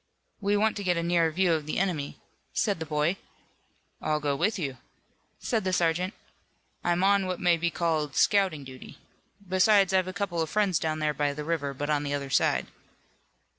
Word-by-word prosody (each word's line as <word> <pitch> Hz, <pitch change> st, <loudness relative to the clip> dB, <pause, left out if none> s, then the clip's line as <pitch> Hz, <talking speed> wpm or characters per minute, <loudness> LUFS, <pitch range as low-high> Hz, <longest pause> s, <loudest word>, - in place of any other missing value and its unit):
"We 205 Hz, 0 st, +1 dB
want 220 Hz, +1 st, +2 dB
to 205 Hz, -, -4 dB
get 180 Hz, -2 st, +1 dB
a 170 Hz, -, -1 dB
nearer 170 Hz, -1 st, +2 dB
view 175 Hz, +2 st, +2 dB
of 155 Hz, -2 st, -2 dB
the -, -, -2 dB
enemy," 170 Hz, -7 st, -1 dB, 0.4 s
said 205 Hz, -5 st, 0 dB
the 160 Hz, -, -5 dB
boy. 155 Hz, +4 st, 0 dB, 0.8 s
"I'll 155 Hz, 0 st, 0 dB
go 145 Hz, -2 st, 0 dB
with 200 Hz, +10 st, 0 dB
you," 140 Hz, -7 st, -3 dB, 0.6 s
said 225 Hz, -5 st, -1 dB
the 185 Hz, -, 0 dB
sergeant. 180 Hz, +2 st, +1 dB, 0.7 s
"I'm 175 Hz, +1 st, +1 dB
on 200 Hz, -1 st, +3 dB
what 185 Hz, -1 st, -3 dB
may 175 Hz, -1 st, +4 dB
be 170 Hz, +1 st, 0 dB
called 160 Hz, -4 st, -1 dB
scouting 190 Hz, -8 st, +2 dB
duty. 130 Hz, -1 st, -11 dB, 0.5 s
Besides, 190 Hz, +1 st, +4 dB
I've 185 Hz, -1 st, +3 dB
a -, -, -3 dB
couple 190 Hz, -3 st, -2 dB
of 160 Hz, -, -2 dB
friends 200 Hz, -6 st, +1 dB
down 155 Hz, -1 st, -1 dB
there 155 Hz, -1 st, 0 dB
by 145 Hz, -1 st, 0 dB
the 150 Hz, -, -5 dB
river, 150 Hz, -3 st, -2 dB
but 145 Hz, +3 st, -2 dB
on 145 Hz, -1 st, +2 dB
the 145 Hz, -1 st, -2 dB
other 140 Hz, -1 st, -5 dB
side." -, -, +2 dB
170 Hz, 195 wpm, -27 LUFS, 150-190 Hz, 0.8 s, may